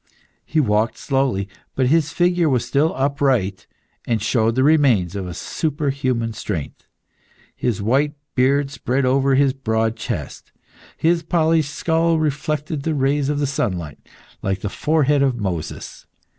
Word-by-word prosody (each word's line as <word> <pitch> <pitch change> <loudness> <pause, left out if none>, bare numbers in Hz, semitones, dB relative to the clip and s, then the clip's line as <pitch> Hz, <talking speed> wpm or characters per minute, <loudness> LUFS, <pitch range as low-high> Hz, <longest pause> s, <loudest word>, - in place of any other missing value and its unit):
He 160 - +1
walked 110 -4 +1
slowly, 135 -8 0 0.3
but 130 - +2
his 160 +3 +2
figure 175 -2 +2
was 125 -3 +1
still 140 +6 +2
upright, 135 -8 0 0.4
and 115 -2 +1
showed 110 +1 +1
the 130 - +2
remains 130 - +3
of 95 -2 -4
a 90 - -6
superhuman 135 - -2
strength. 95 -8 -5 0.7
His 110 -5 -2
white 140 +7 +1 0.2
beard 135 +2 +2
spread 135 -1 -1
over 135 +1 +3
his 135 -1 +3
broad 110 -4 -1
chest, - - -6 0.5
his 165 +1 +2
polished 160 -2 +1
skull 165 0 +1
reflected 150 0 -2
the 160 +2 -1
rays 140 +1 +1
of 145 -1 0
sunlight 90 - -3 0.4
like 95 0 -2
the 105 - -2
forehead 150 +2 +1
of 135 -3 +2
Moses. 90 -7 -5
135 Hz, 140 wpm, -21 LUFS, 115-150 Hz, 0.7 s, remains